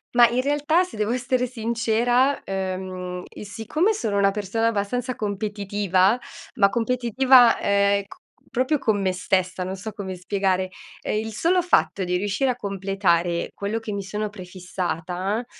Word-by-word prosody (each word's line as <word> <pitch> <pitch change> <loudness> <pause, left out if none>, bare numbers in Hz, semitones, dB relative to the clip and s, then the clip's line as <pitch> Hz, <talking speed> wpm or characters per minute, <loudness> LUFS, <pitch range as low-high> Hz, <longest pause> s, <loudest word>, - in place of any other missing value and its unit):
Ma 240 -1 +8
in 240 +2 0
realtà, 295 +5 +2
se 365 -11 -9
devo 210 +1 0
essere 250 0 0
sincera, 235 +3 +1
ehm, 185 -1 -4 0.2
siccome 235 - 0
sono 220 - -2
una 195 0 +4
persona 210 +3 -2
abbastanza 230 +4 -1
competitiva, 205 0 0 0.4
ma 200 - +4
competitiva, 245 +2 +4
ehm 200 0 +2
c - - -14 0.3
proprio 260 +4 +1
con 220 -6 +1
me 190 -1 0
stessa, 185 0 0
non 185 +1 -4
so 200 +3 -6
come 190 -3 -6
spiegare, 190 0 0 0.3
ehm 210 - -1
il 220 +1 -4
solo 350 - +2
fatto 345 - +2
di 180 0 0
riuscire 205 +7 0
a 250 - 0
completare 195 -5 0
quello 200 +2 -3
che 225 -1 -5
mi 200 - -2
sono 210 +2 -3
prefissata, 185 +2 -4
205 Hz, 150 wpm, -23 LUFS, 190-240 Hz, 0.4 s, Ma